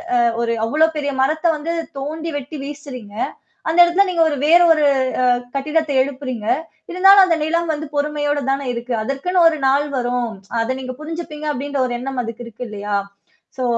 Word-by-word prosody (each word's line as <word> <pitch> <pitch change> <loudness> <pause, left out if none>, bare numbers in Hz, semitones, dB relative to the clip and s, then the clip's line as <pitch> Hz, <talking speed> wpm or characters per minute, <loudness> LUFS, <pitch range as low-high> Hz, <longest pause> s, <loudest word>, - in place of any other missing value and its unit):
அ - - +4 0.2
ஒரு 235 0 0 0.2
அவ்ளோ 310 +7 +3
பெரிய 285 -1 -2
மரத்த 310 +5 -1
வந்து 310 +3 -4 0.3
தோண்டி 315 +4 -4
வெட்டி 290 +2 -7
வீசுறீங்க. 270 -7 -8 0.5
அந்த 330 +2 +1
இடத்துல 345 +3 +4
நீங்க 355 -2 0
ஒரு 295 - -1
வேற 340 +3 +7
ஒரு 305 -1 0 0.4
அ - - +2 0.3
கட்டிடத்த 300 +2 0
எழுப்புறீங்க. 260 -4 -4 0.5
இருந்தாலும் 385 +2 +7
அந்த 340 -2 +2
நிலம் 335 +1 0
வந்து 305 +1 -4
பொறுமையோடு 290 0 0
தானே 275 0 -2
இருக்கு. 240 +1 -4
அதற்குன்னு 275 +10 -1
ஒரு 320 -1 +2
நாள் 280 +2 +3
வரும். 245 -1 -1 0.3
அத 230 +3 0
நீங்க 255 -1 -5
புரிஞ்சுப்பீங்க 310 -1 -6
அப்டின்ற 285 0 -3
ஒரு 245 - -4
எண்ணம் 265 +1 -4
அதுக்கு 230 0 -6
இருக்கு 235 +1 -8
இல்லையா? 205 0 -3 0.6
சோ, 255 - -2
285 Hz, 170 wpm, -19 LUFS, 255-315 Hz, 0.6 s, வேற